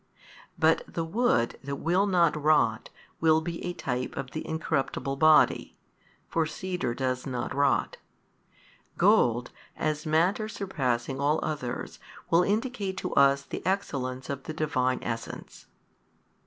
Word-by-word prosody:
But 160 0 +4
the 165 - -2
wood 165 - +1
that 140 +1 -3
will 180 +7 +1
not 175 -5 +3
rot 150 -7 +2 0.3
will 160 -1 +4
be 165 +1 -5
a 175 - -3
type 125 -6 -3
of 135 -2 -5
the 155 - -4
incorruptible 140 -3 -2
Body 155 +1 +4 0.5
(for 165 -1 0
cedar 180 -9 -3
does 130 0 -2
not 125 -2 -3
rot); 140 0 +1 1.0
gold 120 +1 +3 0.3
as 155 0 -2
matter 180 +8 +2
surpassing 135 - -2
all 150 +2 +2
others 130 -5 -4 0.3
will 170 +1 +6
indicate 205 -1 -1
to - - -3
us 140 0 +4
the - - -7
Excellence 135 -9 -2
of 140 -1 -5
the 155 - -5
Divine 130 -5 0
Essence. 115 -1 -6
155 Hz, 130 wpm, -28 LUFS, 130-170 Hz, 1.0 s, will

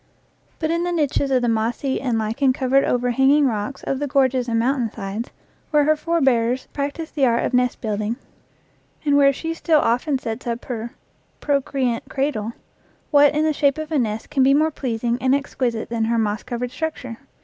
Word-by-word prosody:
But 315 0 -1
in 335 +1 0
the 355 - -1
niches 290 -4 0
of 255 -2 +2
the - - +2
mossy 230 +4 -1
and 245 -4 0
lichen 230 +5 +1
covered 270 +1 +2
over 245 0 +1
hanging 275 +4 +4
rocks 230 +2 -2
of 270 - -2
the 290 - -2
gorges 260 -3 +1
and 230 - +1
mountain 245 0 +1
sides, 210 +2 -5 0.4
where 300 -1 +3
her 310 +2 +3
forbears 265 -7 +1
practiced 290 +3 -4
the 275 -3 +3
art 235 0 +1
of - - -3
nest 250 0 +1
build 215 -2 -2
ing, 215 +2 -2 0.9
and 290 -1 +3
where 280 -1 +6
she 325 +4 -4
still 325 -2 +2
often 260 +4 +1
sets 235 0 -6
up 235 0 -3
her 235 -1 -5 0.4
"procre 280 -1 -1
ant 235 -2 -1
cradle," 260 -6 -2 0.6
what 290 -1 +5
in 305 - +2
the 310 0 +2
shape 280 -1 +2
of 310 0 -5
a 305 - +2
nest 220 0 -3
can 280 -3 +1
be 270 +1 +5
more 310 +2 +2
pleasing 240 -3 -2
and 260 +1 +3
exquisite 255 -5 -2
than 230 -1 0
her 230 +1 +1
moss 215 -1 0
covered 245 0 -4
structure? 260 -6 -5
260 Hz, 200 wpm, -22 LUFS, 235-285 Hz, 0.9 s, where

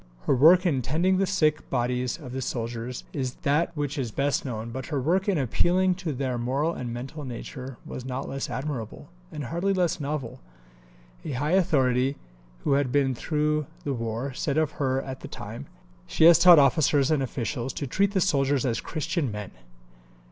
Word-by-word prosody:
Her - - +2
work 170 +8 +6
in 140 -7 +2
tending 170 +9 +1
the 195 - +2
sick 155 -6 +1
bodies 125 0 -1
of 145 -6 -9
the 130 +1 -4
soldiers 120 0 -4
is 130 -3 -3
that 150 +4 +2
which 145 0 -2
is 125 -4 -2
best 140 +5 0
known, 115 -3 -5
but 130 +2 -6
her 150 -4 -1
work 185 +9 +1
in 190 - +2
appealing 175 +8 +2
to 170 -4 -2
their 130 -2 -2
moral 135 +7 0
and 125 -5 -5
mental 130 +6 -6
nature 130 0 -7
was 130 - -7
not 130 +1 -4
less 135 0 -4
admirable, 130 -6 -5 0.2
and 150 - -5
hardly 175 +9 -1
less 175 -1 +1
novel. 140 -4 -4 0.8
A - - -4
high 145 +5 -1
authority, 135 -7 +2 0.5
who - - +2
had 140 -2 +1
been 135 -1 +2
through 150 +2 -1 0.2
the 140 - -1
war, 115 +2 -3
said 140 +2 -2
of 155 -1 +2
her 135 0 +1
at 130 -1 -7
the - - -8
time, - - -8 0.4
"She - - +1
has 170 0 +9
taught 175 -1 +9
officers 140 0 +4
and 150 -3 +2
officials 125 0 -3
to 140 - -4
treat 195 +9 +1
the 190 - +2
soldiers 140 -6 +2
as 115 -3 0
Christian 160 -3 -2
men." 105 -2 -6
140 Hz, 185 wpm, -26 LUFS, 125-155 Hz, 0.8 s, has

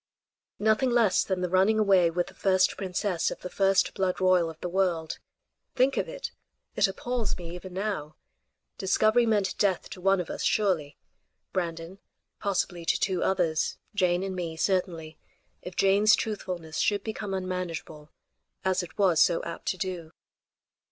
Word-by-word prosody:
Nothing 220 +5 +2
less 235 -5 +3
than 190 -2 -2
the 180 - 0
running 190 +4 +4
away 195 -5 +4
with 175 +1 -1
the - - -13
first 185 -1 +2
princess 185 -2 -1
of - - -7
the 180 - -7
first 195 -1 +2
blood 185 -1 -1
royal 185 -3 +3
of 160 -1 -11
the 180 - -4
world. 175 -3 -1 0.6
Think 265 +1 +3
of - - -1
it! - - -6 0.4
It - - +4
appalls 240 +3 -3
me 170 -1 -7
even 180 +1 -8
now. 185 -6 -3 0.6
Discovery 215 +4 +3
meant 205 -3 +1
death 195 -4 +1
to 185 - -8
one 195 +1 +3
of 175 - -3
us - - -5
surely 180 -9 +1 0.6
Brandon; 170 +1 -4 0.4
possibly 185 -4 -1
to - - +1
two 185 -2 0
others 165 -4 0 0.2
Jane 180 -2 +1
and 190 -1 -3
me; 170 -3 -4
certainly, 165 -4 -1 0.4
if 180 0 -8
Jane's 200 +2 +5
truthfulness 180 -7 -4
should 205 -1 +1
become 210 -3 -4
unmanageable, 180 -5 -5 0.6
as 185 0 +2
it 175 - -10
was 185 -5 +4
so 170 - +3
apt 170 - -7
to 185 - 0
do. 175 -3 -5
185 Hz, 160 wpm, -27 LUFS, 175-200 Hz, 0.6 s, Jane's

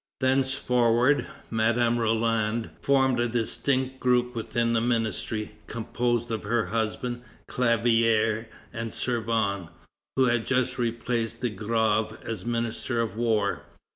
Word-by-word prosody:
Thenceforward, 130 -1 +2 0.2
Madame 115 +1 +2
Roland 115 0 0
formed 130 -3 +3
a 120 - +2
distinct 130 +3 0
group 125 -1 +2
within 115 0 -1
the 115 - +2
ministry, 115 -2 -1 0.2
composed 120 +1 -1
of 110 - -2
her 115 +2 0
husband, 115 +2 -2 0.3
Clavière, 115 -2 +2 0.3
and 115 0 -4
Servan, 110 -7 -1 0.5
who 130 - +4
had 120 -2 +1
just 130 -1 +1
replaced 115 -1 -1
De 120 -3 0
Grave 110 +1 0
as 110 -3 -5
Minister 120 0 -1
of 110 -3 -1
War. 110 -3 +1
115 Hz, 115 wpm, -26 LUFS, 110-125 Hz, 0.5 s, who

